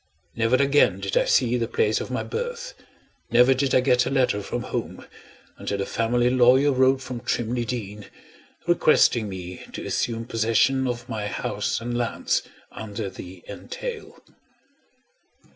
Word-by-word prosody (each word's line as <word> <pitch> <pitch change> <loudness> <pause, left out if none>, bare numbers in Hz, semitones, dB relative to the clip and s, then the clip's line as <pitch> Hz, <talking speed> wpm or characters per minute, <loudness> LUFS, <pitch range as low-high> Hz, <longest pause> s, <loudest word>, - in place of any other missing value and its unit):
Never 115 +2 +2
again 140 -8 +3
did 100 -1 -3
I - - +3
see 125 -1 +2
the 115 - -1
place 455 - +1
of - - -6
my - - -2
birth, 485 +2 -5 0.6
never 125 +2 +5
did 130 0 0
I 130 - +5
get 125 -1 +3
a - - 0
letter 130 -6 +1
from 100 - -4
home, - - -5 0.5
until 100 - -3
the 100 - -2
family 120 +3 +1
lawyer 130 +3 +5
wrote 130 0 +3
from 125 -2 -6
Trimley 120 +1 -2
Deen, 105 -3 -5 0.6
requesting 155 -9 +3
me 90 -1 -7
to - - -6
assume 115 -1 -2
possession 120 +3 +2
of 120 -1 -4
my 110 -3 -3
house - - -2
and 120 +1 -4
lands, 120 -1 0 0.3
under 105 -2 -6
the 90 0 -11
entail. 470 -4 -7
120 Hz, 150 wpm, -24 LUFS, 110-130 Hz, 0.6 s, never